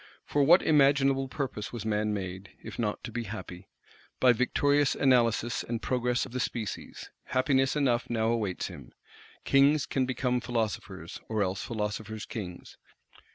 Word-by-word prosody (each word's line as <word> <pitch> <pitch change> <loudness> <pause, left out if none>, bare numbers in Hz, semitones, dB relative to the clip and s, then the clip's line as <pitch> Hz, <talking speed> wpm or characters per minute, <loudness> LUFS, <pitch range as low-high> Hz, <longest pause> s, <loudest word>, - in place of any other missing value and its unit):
For 145 - +1
what 170 +6 +6
imaginable 135 -2 +4
purpose 130 -6 -4
was 115 -3 -6
man 105 0 0
made, 95 -1 -5
if - - -8
not 105 -3 -2
to 120 - -6
be 120 +1 -3
"happy"? 95 -3 -8 0.5
By 125 -1 +6
victorious 140 +4 +2
Analysis, 120 -3 +2
and 115 -1 -3
Progress 125 0 0
of - - -11
the 125 - -3
Species, 115 -3 -4
happiness 135 +1 +2
enough 130 -5 +1
now 115 -1 +1
awaits 110 -6 -1
him. 70 -4 -9 0.5
Kings 140 +1 +4
can 130 -2 0
become 125 -1 0
philosophers; 100 -7 -3
or 110 -2 +1
else 95 0 -2
philosophers 110 -1 -4
Kings. 90 -6 -7
120 Hz, 150 wpm, -29 LUFS, 105-135 Hz, 0.5 s, what